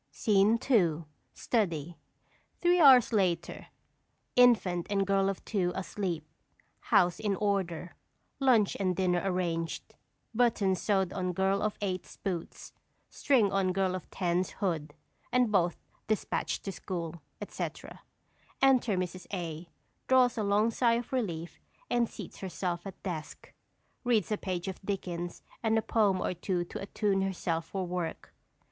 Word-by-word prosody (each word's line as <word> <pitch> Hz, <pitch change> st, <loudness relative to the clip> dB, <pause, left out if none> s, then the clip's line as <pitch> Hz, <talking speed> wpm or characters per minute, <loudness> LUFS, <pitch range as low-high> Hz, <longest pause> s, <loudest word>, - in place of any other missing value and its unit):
_ -, -, -47 dB
SCENE 210 Hz, +1 st, +3 dB
II. 170 Hz, -8 st, +3 dB, 0.3 s
STUDY. 175 Hz, -, -1 dB, 0.6 s
[_Three 350 Hz, 0 st, +4 dB
hours 255 Hz, -5 st, +7 dB
later; 180 Hz, -5 st, 0 dB, 0.7 s
infant 210 Hz, -8 st, +4 dB
and 195 Hz, -1 st, +1 dB
Girl 195 Hz, 0 st, +2 dB
of 195 Hz, -, -5 dB
Two 185 Hz, -5 st, 0 dB
asleep; 185 Hz, -4 st, -3 dB, 0.5 s
house 175 Hz, -1 st, +3 dB
in 205 Hz, -2 st, 0 dB
order; 185 Hz, -4 st, -1 dB, 0.5 s
lunch 245 Hz, -7 st, +4 dB
and 185 Hz, -2 st, +1 dB
dinner 180 Hz, -1 st, +1 dB
arranged; 175 Hz, -3 st, -2 dB, 0.4 s
buttons 215 Hz, -6 st, +2 dB
sewed 190 Hz, -3 st, +1 dB
on 180 Hz, -1 st, -2 dB
Girl 190 Hz, +2 st, +1 dB
of 215 Hz, 0 st, -1 dB
Eight's 185 Hz, -3 st, -4 dB
boots, 175 Hz, -4 st, -5 dB, 0.4 s
string 235 Hz, -8 st, +2 dB
on 190 Hz, -2 st, +1 dB
Girl 190 Hz, -1 st, +1 dB
of 185 Hz, -, -6 dB
Ten's 180 Hz, 0 st, 0 dB
hood, 160 Hz, -6 st, -2 dB, 0.4 s
and 250 Hz, -3 st, +3 dB
both 175 Hz, -4 st, +2 dB, 0.3 s
dispatched 215 Hz, -1 st, -1 dB
to 195 Hz, -, -3 dB
school, 170 Hz, -4 st, -5 dB, 0.2 s
etc. -, -, -6 dB, 0.6 s
Enter 255 Hz, -7 st, +4 dB
Mrs. 185 Hz, 0 st, -4 dB
A. 170 Hz, -3 st, -5 dB, 0.4 s
Draws 255 Hz, -2 st, +4 dB
a 220 Hz, -, -1 dB
long 210 Hz, +2 st, +2 dB
sigh 235 Hz, 0 st, +3 dB
of 235 Hz, +2 st, -3 dB
relief 175 Hz, -10 st, -3 dB, 0.3 s
and 240 Hz, -1 st, +2 dB
seats -, -, -9 dB
herself 180 Hz, -1 st, -3 dB
at 190 Hz, -, -10 dB
desk. 165 Hz, -5 st, -6 dB, 0.5 s
Reads 225 Hz, -6 st, +1 dB
a 210 Hz, -, +1 dB
page 185 Hz, -1 st, -3 dB
of 190 Hz, -, -5 dB
Dickens 175 Hz, -3 st, -4 dB, 0.2 s
and 225 Hz, -1 st, +2 dB
a -, -, +3 dB
poem 205 Hz, -4 st, +2 dB
or -, -, -1 dB
two 175 Hz, 0 st, -2 dB
to -, -, -7 dB
attune 200 Hz, 0 st, 0 dB
herself 175 Hz, -4 st, -1 dB
for 190 Hz, -2 st, -3 dB
work. 175 Hz, -2 st, -4 dB
190 Hz, 140 wpm, -30 LUFS, 175-215 Hz, 0.7 s, hours